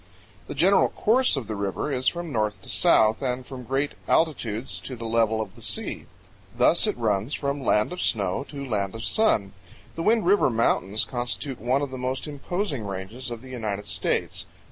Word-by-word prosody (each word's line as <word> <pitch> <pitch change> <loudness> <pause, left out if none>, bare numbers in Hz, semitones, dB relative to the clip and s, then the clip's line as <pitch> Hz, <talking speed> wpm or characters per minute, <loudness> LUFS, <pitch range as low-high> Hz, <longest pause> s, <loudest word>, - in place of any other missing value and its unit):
The - - -6
general 185 +7 +4
course 245 - +3
of 130 - -3
the 110 +1 -4
river 100 +8 -2
is 130 -1 -1
from 170 -2 -1
north 105 -3 0
to - - -11
south 110 0 +4
and 125 -1 -2
from 130 -1 -8
great 135 +3 0 0.2
altitudes 115 - 0
to 95 +8 -6
the 115 -1 -7
level 110 -1 +2
of 105 -4 -4
the - - -15
sea. - - -2 0.5
Thus - - +4
it - - -1
runs 110 +2 0
"from 140 0 -2
land 105 +6 +2
of 180 - -4
snow 100 0 +1
to 140 -2 -6
land 100 -3 -1
of 115 - -6
sun." 110 - +2 0.4
The 165 - -5
Wind 220 +3 +3
River 200 -4 +4
Mountains 110 -3 +1
constitute 125 +1 -4
one 130 +5 +1
of 140 - -4
the 130 - -6
most 130 +1 -2
imposing 150 - -3
ranges 100 +6 -4
of 120 0 -6
the 130 - -11
United 105 -5 -3
States. 90 -3 -1
125 Hz, 190 wpm, -25 LUFS, 105-140 Hz, 0.5 s, general